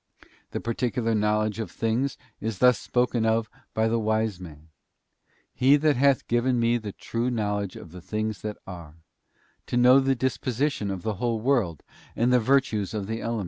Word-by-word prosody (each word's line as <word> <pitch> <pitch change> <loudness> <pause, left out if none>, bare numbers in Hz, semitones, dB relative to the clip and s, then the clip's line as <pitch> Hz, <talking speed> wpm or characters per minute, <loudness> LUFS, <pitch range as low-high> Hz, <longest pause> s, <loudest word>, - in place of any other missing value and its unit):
The - - -4
particular 115 0 -1
knowledge 105 0 +1
of 110 - -3
things 115 +4 -1 0.2
is 110 -1 -3
thus 125 0 +5
spoken 125 -2 0
of 110 -1 +1 0.2
by 110 0 +2
the 115 +1 +1
Wise 110 -3 0
Man: 80 -3 -12 0.8
'He 135 +3 +5
hath 140 -3 +2
given 120 +1 +1
me 120 +1 +2
the 105 -2 -6
true 115 +5 -3
knowledge 105 -4 -2
of 80 - -11
the 90 0 -10
things 110 +1 -3
that 105 -1 -5
are: 85 -5 -10 0.7
to 120 - -1
know 125 +2 +7
the 135 0 +2
disposition 130 -2 -1
of 95 -3 -4
the 110 -3 -2
whole 120 -2 0
world 110 - 0 0.3
and 120 +2 +2
the 125 - +5
virtues 115 -5 +1
of 105 -2 -2
the 110 +2 -4
elements. 115 -1 -2
115 Hz, 175 wpm, -26 LUFS, 105-125 Hz, 0.8 s, know